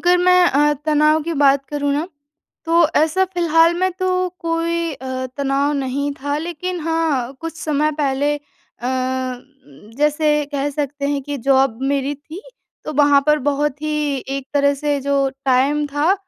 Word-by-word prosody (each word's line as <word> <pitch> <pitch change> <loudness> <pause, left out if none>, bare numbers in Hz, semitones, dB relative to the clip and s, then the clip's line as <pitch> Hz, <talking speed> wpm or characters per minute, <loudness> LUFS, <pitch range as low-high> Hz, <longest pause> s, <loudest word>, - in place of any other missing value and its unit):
अगर 355 +1 +4
मैं 360 0 +5
अ, 295 -2 +3
तनाव 305 +1 +3
की 335 +2 -3
बात 275 0 +4
करूँ 285 -1 -1
ना 300 +4 -1 0.6
तो 335 0 +4
ऐसा 320 +5 +3
फ़िलहाल 340 -2 +3
में 370 +1 +1
तो 370 -1 0
कोई 335 0 -1
अ, 260 0 -5
तनाव 280 +1 0
नहीं 280 +1 -2
था। 285 +1 -1
लेकिन 345 +2 -4
हाँ, 315 -6 -1
कुछ 330 0 -6
समय 305 0 0
पहले 285 +1 +1
अ, - - -12 1.6
जैसे 300 0 +2
कह 285 0 -1
सकते 285 0 -3
हैं 285 -1 -1
कि 290 +1 -4
जॉब 265 -4 +3
मेरी 280 +1 -1
थी, 315 +7 -11 0.4
तो 305 - -4
वहाँ 285 -1 +5
पर 300 0 +4
बहुत 290 0 -1
ही 300 -2 -1 0.2
एक 275 - -6
तरह 280 0 +3
से 290 0 -1
जो 275 0 +1 0.2
टाइम 275 +3 +2
था, 290 +6 +1
295 Hz, 160 wpm, -19 LUFS, 280-330 Hz, 1.6 s, मैं